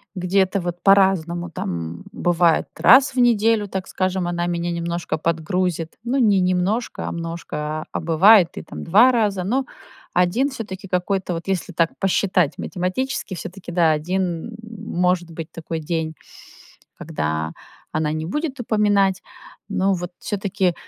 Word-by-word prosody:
где-то 190 +1 +1
вот 175 0 -4
по-разному, 180 -3 +3
там, 85 - -5
бывает 175 -2 +2
раз 260 +7 +6
в - - -11
неделю, 225 -3 +3
так 190 -1 -4
скажем, 185 -1 -1
она 175 0 -1
меня 175 0 -2
немножко 170 0 -2
подгрузит. 165 +1 -1
Ну, 250 +3 -1
не 210 -6 +4
немножко, 185 +6 0
а - - -3
множко, 165 0 -5 0.3
а - - -9
а - - -2
бывает 175 +3 +6
и - - -5
там - - -8
2 220 +9 +6
раза. 205 -6 +1
Но 260 +7 0 0.5
1 200 +11 +2
всё-таки 195 -7 -7
какой-то 180 0 -1
вот, 165 +2 -6
если 190 -1 -2
так 165 0 +2
посчитать 185 -5 +1
математически, 210 +5 -3
всё-таки 185 -2 -8
да, 165 -2 +3
1 180 +6 -2
может 180 -5 -1
быть 165 0 -7
такой 165 -1 -5
день, 160 0 -3 0.8
когда 80 +1 -3 0.4
она 155 -1 0
не 155 0 -3
будет 290 - -3
упоминать. 205 -4 +2 0.5
Но 195 -1 +1
вот 175 0 -5
всё-таки, 195 -3 -1
180 Hz, 145 wpm, -22 LUFS, 170-205 Hz, 0.8 s, раз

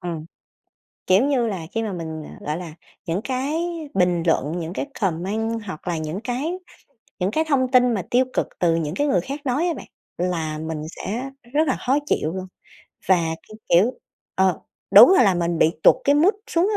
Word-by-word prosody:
ừm, 170 -4 -5 0.8
kiểu 190 +7 +5
như 265 -5 +1
là, 185 -7 -4
khi 225 - -1
mà 210 -3 -3
mình, 160 -3 -5
ờ, - - -12
gọi 150 +1 -1
là, 170 -3 -7 0.3
những 175 +2 -1
cái 265 +3 -2 0.4
bình 180 -3 +2
luận 155 -3 +1
những 165 +2 -5
cái 280 - -3
comment 210 +6 -1
hoặc 185 -2 -8
là 170 - -1
những 155 +4 -4
cái 260 +9 -2 0.7
những 185 +2 0
cái 315 - +1
thông 265 -4 +2
tin 250 -2 +5
mà 195 - -1
tiêu 255 +2 +4
cực - - 0
từ 170 -2 +3
những 165 0 -2
cái 290 - +1
người 185 -11 +2
khác 275 - -6
nói 285 +8 +1
á 340 - 0
bạn - - -9 0.3
là 165 -3 -2
mình 160 0 -4
sẽ 240 +8 -4 0.2
rất 310 +1 +2
là 260 - +1
khó 270 - +4
chịu 160 - 0
luôn. 185 0 -5 0.6
Và 190 - +6 0.3
cái 215 - -11
kiểu 185 +8 +5 0.4
ờ, 190 -1 +2 0.3
đúng 375 - +10
ra - - +6
là 195 -5 +4
mình 170 -1 -1
bị 160 - +5
tụt - - +8
cái 285 - +4
mood 345 +8 +4 0.2
xuống 345 +4 +2
190 Hz, 205 wpm, -22 LUFS, 170-255 Hz, 0.8 s, đúng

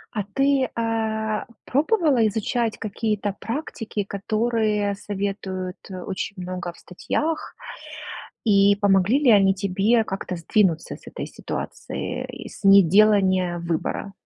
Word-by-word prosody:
А 210 - 0
ты, 275 -1 +3
а, 220 -1 -1 0.2
пробовала 290 - +3
изучать 220 +2 -1
какие-то 210 -1 -2
практики, 225 -5 -4
которые 215 0 0
советуют 195 -2 -4
очень 190 +2 -5
много 180 -1 -4
в - - -20
статьях, 310 - -3 0.9
и 200 -2 +5
помогли 200 +4 +3
ли 275 -5 +4
они 195 -2 +5
тебе 200 +4 +2
как-то 190 -2 -4
сдвинуться 170 -1 +1
с - - -21
этой - - -6
ситуации - - -5 0.2
и - - -7
с - - -13
неделания 195 -2 +5
выбора? 170 +4 -3
205 Hz, 115 wpm, -23 LUFS, 190-225 Hz, 0.9 s, и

